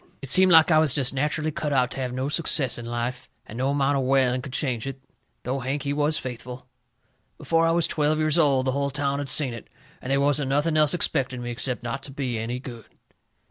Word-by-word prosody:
It 135 Hz, -, -4 dB
seemed 185 Hz, +6 st, +6 dB
like 160 Hz, 0 st, +6 dB
I 155 Hz, -, +5 dB
was 155 Hz, -4 st, +3 dB
jest 135 Hz, -2 st, 0 dB
natcherally 150 Hz, +3 st, -1 dB
cut 150 Hz, 0 st, -3 dB
out 130 Hz, -2 st, +1 dB
to -, -, -5 dB
have 130 Hz, -1 st, -3 dB
no 130 Hz, +2 st, -3 dB
success 145 Hz, -4 st, +1 dB
in 120 Hz, -, -8 dB
life, 120 Hz, +1 st, -4 dB, 0.2 s
and 110 Hz, -, -11 dB
no 130 Hz, +2 st, 0 dB
amount 140 Hz, 0 st, +1 dB
of -, -, -1 dB
whaling 130 Hz, -1 st, +1 dB
could 140 Hz, 0 st, -9 dB
change 130 Hz, -3 st, -2 dB
it, 135 Hz, 0 st, -6 dB, 0.4 s
though 130 Hz, +3 st, -3 dB
Hank, 135 Hz, +2 st, -3 dB
he 140 Hz, -, -2 dB
was 150 Hz, +1 st, +1 dB
faithful. 125 Hz, 0 st, -8 dB, 0.7 s
Before 165 Hz, 0 st, +1 dB
I -, -, +2 dB
was 170 Hz, 0 st, +2 dB
twelve 150 Hz, 0 st, 0 dB
years 155 Hz, +1 st, +1 dB
old 135 Hz, -4 st, +2 dB
the 130 Hz, -, +1 dB
hull 140 Hz, +1 st, -1 dB
town 140 Hz, 0 st, -2 dB
had 145 Hz, -1 st, -3 dB
seen 135 Hz, -5 st, +3 dB
it, 115 Hz, -, -10 dB, 0.3 s
and 125 Hz, -, -5 dB
they 135 Hz, -, +3 dB
wasn't 140 Hz, 0 st, +1 dB
nothing 150 Hz, +4 st, +1 dB
else 155 Hz, +1 st, +4 dB
expected 135 Hz, -7 st, 0 dB
of 120 Hz, -, -7 dB
me 120 Hz, -, -4 dB
except 125 Hz, +1 st, -3 dB
not 120 Hz, +3 st, -4 dB
to 135 Hz, -, -7 dB
be 130 Hz, -4 st, -3 dB
any 115 Hz, +3 st, -4 dB
good. 120 Hz, -4 st, -10 dB
135 Hz, 240 wpm, -24 LUFS, 125-150 Hz, 0.7 s, seemed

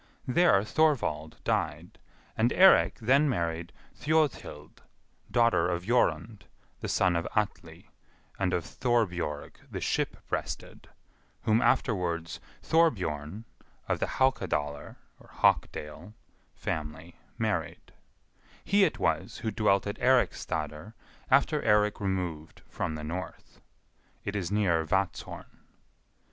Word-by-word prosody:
There 130 Hz, -, +4 dB
Thorvald 105 Hz, -, 0 dB
died, -, -, -2 dB, 0.4 s
and 115 Hz, +2 st, +2 dB
Eirik 190 Hz, +1 st, +6 dB
then 140 Hz, +6 st, +3 dB
married 85 Hz, -6 st, -2 dB, 0.2 s
Thjodhild, 155 Hz, -2 st, -1 dB, 0.5 s
daughter 115 Hz, -6 st, +3 dB
of 85 Hz, -1 st, -2 dB
Jorund, 115 Hz, -1 st, 0 dB, 0.3 s
the -, -, -5 dB
son 90 Hz, -2 st, +2 dB
of 85 Hz, 0 st, -1 dB
Atli, 105 Hz, -1 st, -3 dB, 0.5 s
and 95 Hz, -2 st, +1 dB
of 85 Hz, -, 0 dB
Thorbjorg 90 Hz, -, -1 dB
the -, -, -5 dB
Ship -, -, -1 dB
breasted, -, -, -5 dB, 0.5 s
whom 110 Hz, +2 st, +3 dB
afterwards 85 Hz, -9 st, 0 dB, 0.2 s
Thorbjorn, 105 Hz, -, +1 dB, 0.4 s
of -, -, 0 dB
the -, -, 0 dB
Haukadalr 75 Hz, -, -1 dB, 0.3 s
(Hawkdale) 80 Hz, +7 st, -1 dB, 0.4 s
family, 80 Hz, +2 st, -5 dB, 0.2 s
married; -, -, -3 dB, 0.7 s
he 200 Hz, 0 st, +4 dB
it 175 Hz, -, +1 dB
was 80 Hz, +8 st, -1 dB
who 110 Hz, -, 0 dB
dwelt 100 Hz, -2 st, +2 dB
at 100 Hz, -, -4 dB
Eiriksstadr 85 Hz, -, 0 dB, 0.4 s
after 140 Hz, +3 st, +3 dB
Eirik 105 Hz, -1 st, +2 dB
removed 90 Hz, -6 st, -4 dB
from 80 Hz, -, -3 dB
the 75 Hz, -, -6 dB
north. 85 Hz, +4 st, -7 dB, 0.6 s
It 100 Hz, -, -3 dB
is 95 Hz, -3 st, -2 dB
near 95 Hz, -6 st, +2 dB
Vatzhorn. 95 Hz, +4 st, -3 dB
100 Hz, 105 wpm, -29 LUFS, 80-120 Hz, 0.7 s, Eirik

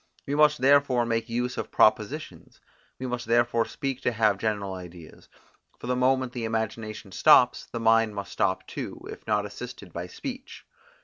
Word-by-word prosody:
We 140 Hz, -, -3 dB
must 150 Hz, 0 st, +4 dB
therefore 135 Hz, -3 st, +4 dB
make 115 Hz, 0 st, -1 dB
use 125 Hz, +2 st, -2 dB
of -, -, -4 dB
propositions; -, -, 0 dB, 0.4 s
we 130 Hz, -, -6 dB
must 125 Hz, -2 st, -4 dB
therefore 115 Hz, 0 st, +2 dB
speak 135 Hz, -1 st, -4 dB
to 125 Hz, -, +1 dB
have 110 Hz, -3 st, +2 dB
general 100 Hz, -3 st, -2 dB
ideas; 90 Hz, -3 st, -11 dB, 0.5 s
for -, -, -10 dB
the 125 Hz, +1 st, 0 dB
moment 130 Hz, 0 st, +1 dB
the 120 Hz, -2 st, -3 dB
imagination 110 Hz, -2 st, -4 dB
stops, 125 Hz, +2 st, +5 dB
the 115 Hz, -, -5 dB
mind 115 Hz, -1 st, +3 dB
must 100 Hz, 0 st, -6 dB
stop 95 Hz, -, 0 dB
too, -, -, -6 dB
if -, -, -11 dB
not 105 Hz, -1 st, +1 dB
assisted 105 Hz, -4 st, -9 dB
by 85 Hz, +1 st, -5 dB
speech. 260 Hz, -, -8 dB
115 Hz, 170 wpm, -26 LUFS, 105-125 Hz, 0.5 s, stops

